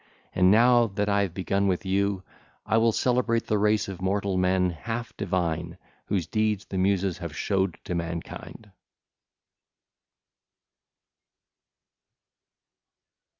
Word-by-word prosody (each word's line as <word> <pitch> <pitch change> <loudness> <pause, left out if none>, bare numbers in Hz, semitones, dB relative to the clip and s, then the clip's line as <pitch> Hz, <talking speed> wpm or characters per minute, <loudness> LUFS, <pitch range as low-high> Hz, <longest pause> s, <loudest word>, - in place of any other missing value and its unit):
And 90 0 +4
now 120 +3 +5
that 105 0 -2
I 100 0 +3
have 95 -4 -2
begun 100 +1 0
with 95 +2 -1
you, 100 0 0 0.4
I 110 - +1
will 115 0 +4
celebrate 120 -1 +1
the 105 - 0
race 105 0 +2
of 95 -2 -7
mortal 100 +1 0
men 90 0 +2
half 115 +8 -5
divine 85 -3 -2 0.3
whose 95 -5 0
deeds 110 0 -1
the 95 - -4
Muses 95 -1 +1
have 85 -4 -6
showed 95 -3 0
to - - -4
mankind. 85 +5 -6
100 Hz, 115 wpm, -26 LUFS, 90-105 Hz, 0.4 s, now